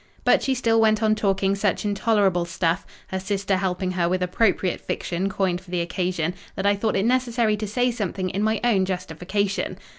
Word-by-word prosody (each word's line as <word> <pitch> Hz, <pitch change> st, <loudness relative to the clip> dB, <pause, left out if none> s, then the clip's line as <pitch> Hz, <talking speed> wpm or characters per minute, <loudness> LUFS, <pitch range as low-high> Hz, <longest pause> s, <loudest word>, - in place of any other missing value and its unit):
But -, -, +4 dB
she 265 Hz, -, 0 dB
still 225 Hz, -2 st, +2 dB
went 215 Hz, 0 st, +3 dB
on 215 Hz, 0 st, +4 dB
talking 195 Hz, -2 st, +1 dB
such 200 Hz, +1 st, 0 dB
intolerable 200 Hz, -3 st, +2 dB
stuff—her 170 Hz, +2 st, -3 dB
sister 195 Hz, 0 st, -1 dB
helping 185 Hz, -1 st, -1 dB
her 175 Hz, -2 st, 0 dB
with 185 Hz, 0 st, 0 dB
appropriate 185 Hz, -1 st, +1 dB
fiction 180 Hz, +3 st, -2 dB
coined 185 Hz, -2 st, -1 dB
for 185 Hz, -, -18 dB
the 180 Hz, -1 st, -1 dB
occasion—that 180 Hz, +2 st, -3 dB
I 200 Hz, 0 st, +4 dB
thought 215 Hz, +2 st, -1 dB
it 195 Hz, -, +1 dB
necessary 240 Hz, -3 st, +2 dB
to 210 Hz, 0 st, -4 dB
say 245 Hz, +4 st, +1 dB
something 195 Hz, -4 st, -3 dB
in 195 Hz, -, -2 dB
my 220 Hz, 0 st, +1 dB
own 205 Hz, -6 st, +3 dB
justification. 185 Hz, +2 st, -2 dB
195 Hz, 180 wpm, -24 LUFS, 185-215 Hz, -, But